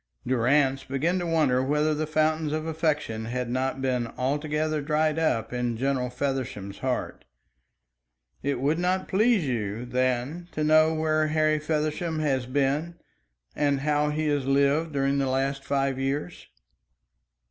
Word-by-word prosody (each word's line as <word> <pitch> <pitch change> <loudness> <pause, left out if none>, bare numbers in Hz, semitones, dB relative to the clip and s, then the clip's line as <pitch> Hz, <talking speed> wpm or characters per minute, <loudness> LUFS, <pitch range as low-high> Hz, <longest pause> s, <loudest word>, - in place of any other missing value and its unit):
Durrance 130 +2 +2
began 155 +7 0
to 175 - -2
wonder 150 -6 +2
whether 150 +3 +1
the 155 +1 -2
fountains 155 0 +1
of 155 0 -2
affection 155 -9 -1
had 120 +1 -3
not 130 +1 -1
been 125 -3 0
altogether 150 +3 -1
dried 155 +1 +1
up 115 -8 0
in 120 -2 -1
General 130 0 0
Feversham's 125 -7 -3
heart. 130 -1 -3 1.2
"It 140 -2 -1
would 145 +5 +1
not 185 +1 0
please 215 -2 +3
you, 115 -2 -2
then, 130 +6 -1
to 155 - -1
know 155 +1 +5
where 155 0 +1
Harry 155 0 +2
Feversham 155 +2 -1
has 135 -5 0
been, 145 +5 0 0.6
and 145 -2 +1
how 150 0 +1
he 155 +1 -1
has 145 -3 0
lived 140 +3 +2
during 140 0 +1
the 135 - +1
last 135 +1 -1
five 135 0 0
years?" 140 +6 -3
145 Hz, 145 wpm, -26 LUFS, 130-155 Hz, 1.2 s, know